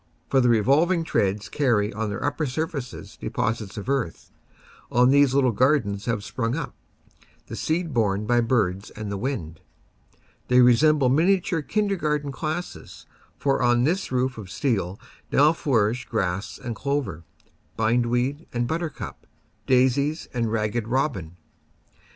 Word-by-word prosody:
For 135 - +4
the 125 - +3
revolving 150 - +3
treads 100 - 0
carry 115 -8 +1
on 110 +1 -2
their 100 - -4
upper 145 +1 -1
surfaces 140 -1 -5
deposits 110 -2 -2
of 100 - -6
earth; 135 -11 -2 0.6
on 125 +1 +4
these 140 -1 +4
little 130 -3 +4
gar 130 +7 +4
dens 100 -3 -5
have 115 -4 -1
sprung 115 +4 -2
up, 140 -6 -4 0.7
the - - -7
seed 165 -1 -1
borne 105 -3 +1
by 120 +2 +3
birds 105 -5 0
and 105 -1 -7
the 100 - -2
wind. 95 - -4 0.9
They 125 0 +4
resemble 135 +3 +5
miniature 170 +4 +2
kindergarten 150 -6 -1
classes, 155 +5 -5 0.3
for 135 -2 +1
on 120 0 +3
this 175 +5 0
roof 125 -1 0
of 100 -4 -9
steel 100 -5 -1 0.3
now 150 +3 +5
flourish 120 -6 0
grass 95 -3 -2
and 120 -2 -5
clover, 135 - -2 0.5
bindweed 120 +6 0
and 120 0 -1
buttercup, 160 0 -5 0.4
daisies 135 +4 +2
and 115 -3 -1
Ragged 110 0 -1
Robin. 115 - -1
125 Hz, 140 wpm, -24 LUFS, 110-145 Hz, 0.9 s, resemble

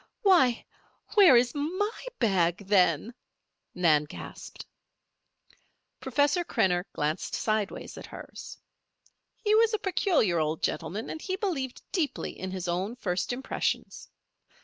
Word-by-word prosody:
"Why! 335 - +4 0.5
where 405 -3 +7
where 255 - +8
is 240 0 +2
my 370 +12 -2
bag, 190 -4 +1
then?" 185 +1 +3 0.6
Nan 155 -4 +3
gasped. 150 - -9 1.3
Professor 285 +7 +1
Krenner 180 - +1
glanced 150 +2 -2
sideways 215 -2 -2
at - - -10
her. - - -10 1.0
He 425 -1 +1
was 445 0 +4
a - - 0
peculiar 355 - +1
old 155 0 -1
gentleman, 180 +7 -2
and 315 - -6
he 375 - -2
believed 330 - -3
deeply 305 -8 -1
in 190 - -6
his 185 -1 -5
own 185 +6 -2
first 185 -5 -2
impressions. 260 +2 -3
235 Hz, 125 wpm, -28 LUFS, -, 1.3 s, where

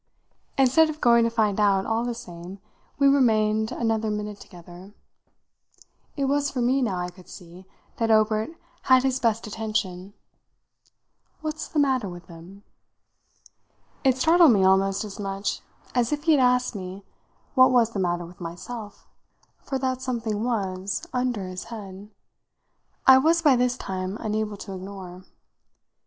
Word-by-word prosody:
Instead 270 +4 +4
of 310 0 -6
going 235 -3 +5
to 230 - +2
find 215 -3 0
out, 200 -2 +3
all 225 +1 0
the 240 -1 -3
same, 180 -5 -9 0.4
we 280 - +4
remained 220 -5 +3
another 225 -1 -1
minute 210 -1 -4
together. 180 +3 -13 1.2
It 280 - 0
was 285 +1 +1
for 265 - -4
me, 255 +3 +2
now, 205 -7 -1
I 180 0 -4
could 180 0 -17
see, 180 +1 -13 0.3
that 230 -1 0
Obert 215 +2 +2 0.4
had 260 -1 +5
his 265 -1 0
best 230 -2 0
attention. 205 -3 -4 1.3
"What's 310 0 -4
the - - -6
matter 260 -8 +2
with 175 0 -10
them?" 175 +4 -13 1.4
It 265 -2 +3
startled 325 0 +6
me 195 -3 +3
almost 195 +1 +3
as 210 0 -9
much 195 0 -3 0.3
as 245 0 +1
if 295 0 -2
he 325 - +3
had 290 -4 +4
asked 250 0 +2
me 190 -1 -7 0.5
what 255 -2 +6
was 235 -3 +3
the 205 - -4
matter 175 -1 -1
with 180 +2 -14
myself 205 +5 -8 0.5
for 270 - -4
that 260 -1 -2
something 230 -4 -2
was, 195 -5 -2
under 250 -5 -1
this 185 0 -7
head, 205 -3 -9 1.0
I 265 0 +8
was 330 +4 +2
by 290 -4 +6
this 250 0 +1
time 185 +1 -4
unable 215 -1 -2
to 195 -1 -8
ignore. 185 -1 -9
220 Hz, 150 wpm, -25 LUFS, 190-255 Hz, 1.4 s, I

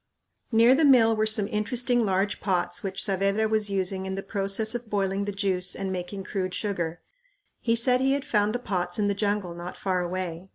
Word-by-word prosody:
Near 230 +2 +6
the 300 +4 +3
mill 240 -6 +6
were 215 0 +1
some 215 -2 +2
interesting 240 +3 0
large 195 +1 0
pots 180 +2 -1
which 195 -2 -2
Saavedra 195 +2 +1
was 215 -1 0
using 190 -1 -1
in 190 - -3
the 195 - -5
process 200 +2 -1
of 240 -2 -5
boiling 195 -1 0
the 205 - -2
juice 190 -2 -1
and 195 -1 -3
making 185 +2 -5
crude 185 -2 -3
sugar. 175 -5 -3 0.6
He 230 -1 +1
said 250 +2 +3
he 270 +1 +3
had 280 0 -2
found 210 +1 +1
the - - +2
pots 180 -7 -2
in 205 -1 +1
the - - +2
jungle 200 -3 -1
not 175 +1 -8
far 185 -2 -1
away. 180 0 -4
200 Hz, 205 wpm, -26 LUFS, 190-220 Hz, 0.6 s, Near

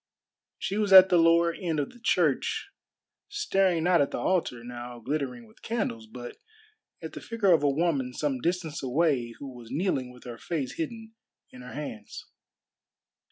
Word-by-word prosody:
She 200 +2 -2
was 205 -2 0
at 190 0 +10
the 175 - +4
lower 170 0 +4
end 165 -4 -2
of 145 - -2
the 245 - -17
church 230 - +1 0.6
staring 195 - +1
not 175 -2 +4
at 140 - +1
the - - -4
altar 160 -10 0
now 120 0 -8
glittering 125 -1 -3
with 110 - -22
candles, 160 - -3
but 120 +2 -9 0.7
at - - -6
the - - -7
figure 225 -5 +1
of 165 -4 +5
a 145 - +3
woman 140 -3 0
some 135 -1 -2
distance 170 -2 -2
away 130 -3 0
who 135 -3 -9
was 120 -2 -12
kneeling 145 -7 -1
with 125 0 -15
her 120 -1 -8
face 150 -7 -4
hidden 225 +7 -5 0.4
in 125 - -12
her 125 0 -10
hands. 125 -8 -7
150 Hz, 170 wpm, -28 LUFS, 125-180 Hz, 0.7 s, at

